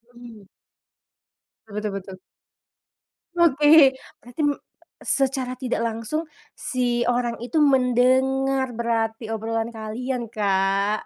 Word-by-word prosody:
Mmm. 230 Hz, -5 st, -13 dB, 1.3 s
Betul 210 Hz, 0 st, -3 dB
betul. 190 Hz, 0 st, -11 dB, 1.2 s
Oke, 300 Hz, -3 st, +6 dB, 0.3 s
berarti 245 Hz, +5 st, -7 dB
me 285 Hz, -, +1 dB, 0.5 s
secara 265 Hz, -2 st, -1 dB
tidak 250 Hz, -3 st, -2 dB
langsung, 230 Hz, +8 st, -3 dB, 0.3 s
si 240 Hz, -2 st, -1 dB
orang 240 Hz, -1 st, 0 dB
itu 305 Hz, +6 st, 0 dB
mendengar 265 Hz, 0 st, +2 dB
berarti 225 Hz, -1 st, -2 dB
obrolan 225 Hz, +1 st, -2 dB
kalian 235 Hz, +3 st, -4 dB
Kak, 200 Hz, -1 st, 0 dB
240 Hz, 90 wpm, -23 LUFS, 225-265 Hz, 1.3 s, Oke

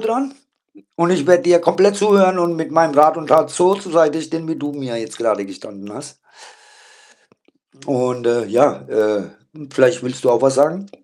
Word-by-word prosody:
dran 250 Hz, +5 st, -3 dB, 0.6 s
und 170 Hz, +1 st, 0 dB
ich 185 Hz, -, -1 dB
werde 180 Hz, -1 st, +4 dB
dir 175 Hz, 0 st, +4 dB
komplett 185 Hz, +4 st, +2 dB
zuhören 200 Hz, -3 st, +3 dB
und 170 Hz, -1 st, -1 dB
mit 160 Hz, -, -5 dB
meinem 160 Hz, -2 st, +2 dB
Rat 155 Hz, +2 st, +5 dB
und 160 Hz, -2 st, -8 dB
Tat 155 Hz, 0 st, +3 dB
so 180 Hz, +4 st, +2 dB
zur 200 Hz, -3 st, -10 dB
Seite 160 Hz, -1 st, +2 dB
sehen, 160 Hz, +1 st, -7 dB
wie 160 Hz, -, -3 dB
du 145 Hz, 0 st, -6 dB
mir 130 Hz, -5 st, -7 dB
jetzt 110 Hz, -1 st, -9 dB
grade 105 Hz, -3 st, -2 dB
gestanden 100 Hz, +1 st, -13 dB
hast 145 Hz, +4 st, -12 dB, 1.7 s
und, 125 Hz, -2 st, -3 dB
äh, 120 Hz, -1 st, 0 dB
ja, -, -, +1 dB
äh, 105 Hz, -2 st, -1 dB, 0.5 s
vielleicht 130 Hz, -2 st, +2 dB
willst 125 Hz, 0 st, -8 dB
du -, -, +2 dB
auch 120 Hz, -, +1 dB
was 135 Hz, -1 st, +2 dB
sagen? 165 Hz, +8 st, 0 dB
155 Hz, 185 wpm, -17 LUFS, 125-175 Hz, 1.7 s, Rat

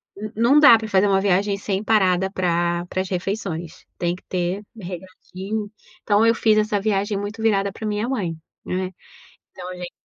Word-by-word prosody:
n 210 Hz, +2 st, -6 dB
não 240 Hz, +7 st, +5 dB
dá 250 Hz, -6 st, +9 dB
pra 220 Hz, 0 st, -6 dB
fazer 195 Hz, 0 st, +3 dB
uma 195 Hz, -1 st, +3 dB
viagem 200 Hz, +1 st, +1 dB
sem 200 Hz, 0 st, -2 dB
parada 190 Hz, -4 st, +2 dB
pra 175 Hz, -2 st, 0 dB
para 185 Hz, -, -2 dB
as 190 Hz, -, -5 dB
refeições. 180 Hz, -3 st, -4 dB
Tem 175 Hz, 0 st, -1 dB
que 180 Hz, -, -17 dB
ter 180 Hz, +2 st, -2 dB
"regradinho". 190 Hz, +2 st, -6 dB, 0.3 s
Então 210 Hz, +1 st, +3 dB
eu 230 Hz, 0 st, +4 dB
fiz 215 Hz, -1 st, +3 dB
essa 210 Hz, -1 st, +1 dB
viagem 205 Hz, -1 st, 0 dB
muito 205 Hz, +2 st, -5 dB
virada 200 Hz, -3 st, +2 dB
pra 215 Hz, +2 st, -6 dB
minha 210 Hz, +3 st, -1 dB
mãe, 185 Hz, -11 st, -2 dB, 0.3 s
né, 185 Hz, 0 st, -2 dB, 0.6 s
então 180 Hz, -, -8 dB
a -, -, -7 dB
gente 180 Hz, -1 st, -7 dB
195 Hz, 185 wpm, -22 LUFS, 180-215 Hz, 0.6 s, dá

